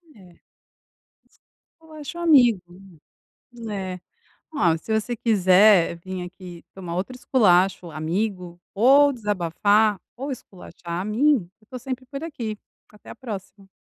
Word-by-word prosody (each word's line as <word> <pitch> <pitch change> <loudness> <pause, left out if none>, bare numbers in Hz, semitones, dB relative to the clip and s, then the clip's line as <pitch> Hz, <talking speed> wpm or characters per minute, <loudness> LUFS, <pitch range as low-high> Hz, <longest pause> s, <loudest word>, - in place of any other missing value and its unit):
É. 185 -4 -17 1.0
S - - -32 0.4
Eu 320 -1 -17
acho 310 +3 -8
amigo. 255 - +5 1.1
É. 190 -3 -5 0.6
Ó, 170 - +2
se 220 - -6
você 240 +3 -4
quiser 195 -4 +4
vim 185 +1 -6
aqui 180 -1 -11
tomar 175 -3 -6
outro 195 +8 -3
esculacho 185 -8 +2
amigo, 175 +2 -3
ou 275 +7 +5
desabafar, 205 -1 +1 0.2
ou 270 +3 -4
esculachar 180 -7 -8
a - - -6
mim, 265 +8 +3 0.3
eu - - -25
estou 250 +4 -9
sempre 255 +1 -6
por 275 +2 -7
aqui. 235 -10 -5 0.3
Até 210 - -15
a - - -8
próxima. 195 -4 -9
205 Hz, 130 wpm, -23 LUFS, 180-250 Hz, 1.1 s, amigo